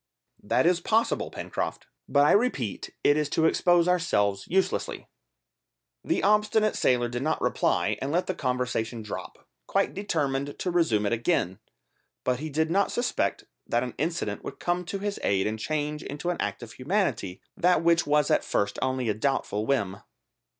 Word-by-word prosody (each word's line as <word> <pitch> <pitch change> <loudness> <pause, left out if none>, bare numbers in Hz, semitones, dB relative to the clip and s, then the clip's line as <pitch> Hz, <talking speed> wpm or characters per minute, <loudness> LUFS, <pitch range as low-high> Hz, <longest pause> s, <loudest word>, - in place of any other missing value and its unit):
"That - - +1
is 175 0 +3
possible, 225 +5 +1
Pencroft; - - -4 0.2
but 140 0 +4
I - - +5
repeat 200 - 0
it 145 - +4
is 150 -1 0
to 160 +2 +2
expose 175 +1 +4
ourselves 105 - +1
uselessly." 190 +2 -1 1.0
The - - 0
obstinate 210 +1 +3
sailor 120 -1 +2
did 120 +1 -4
not 155 +3 0
reply, - - +1
and 135 - -2
let 175 +3 +1
the 185 - -2
conversation 125 -4 -2
drop, 105 - -8 0.2
quite - - +1
determined 145 -8 -2
to 180 - -2
resume 120 -12 +2
it 105 - +1
again. 115 - 0 0.6
But 125 -1 0
he 155 +2 -4
did 160 +2 0
not 200 +3 +2
suspect 245 +1 -1 0.2
that 120 +1 +1
an 125 - -5
incident 150 - -2
would - - -7
come 175 +1 -1
to 195 - -3
his 200 +1 -3
aid 95 -1 +1
and 110 +1 -2
change 150 +4 -2
into 150 +5 -3
an 175 - -3
act - - -3
of 115 - -9
humanity 130 - -1 0.2
that 175 -1 +3
which 170 -1 +3
was 150 -1 +3
at - - +3
first 100 0 -1
only 130 -1 0
a 110 - +2
doubtful 110 -2 -1
whim. 100 -9 0
145 Hz, 170 wpm, -27 LUFS, 120-175 Hz, 1.0 s, I